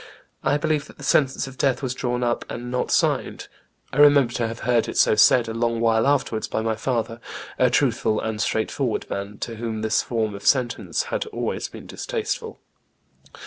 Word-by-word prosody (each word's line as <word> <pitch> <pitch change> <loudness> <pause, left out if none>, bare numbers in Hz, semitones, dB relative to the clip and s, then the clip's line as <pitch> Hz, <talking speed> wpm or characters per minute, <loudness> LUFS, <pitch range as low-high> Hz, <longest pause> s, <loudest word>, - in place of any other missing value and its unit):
I 145 - +2
believe 150 -1 -1
that - - -16
the - - -11
sentence 135 -2 +2
of 135 -1 -11
death 135 -1 +1
was 130 -2 -1
drawn 125 -1 -2
up 120 -1 0
and 120 +1 -6
not 125 - -1
signed. - - 0 0.5
I - - -4
remember 145 -4 +6
to 120 -3 0
have 115 0 -7
heard 120 -1 +1
it - - -5
so - - +5
said 115 +3 +5
a 110 - -4
long 115 0 0
while 115 +1 +3
afterwards 135 -6 0
by - - -2
my 110 0 0
father, 115 0 -2 0.4
a 125 - +5
truthful 120 -3 +1
and 110 -1 -3
straightforward 110 +2 -1
man, 100 +1 -4
to 115 -2 -4
whom 110 -1 -4
this 110 - +2
form 110 -3 -2
of 100 - -8
sentence 130 - +1
had - - -1
always - - -3
been - - -11
distasteful." 460 -2 -4
120 Hz, 190 wpm, -23 LUFS, 110-135 Hz, 0.5 s, remember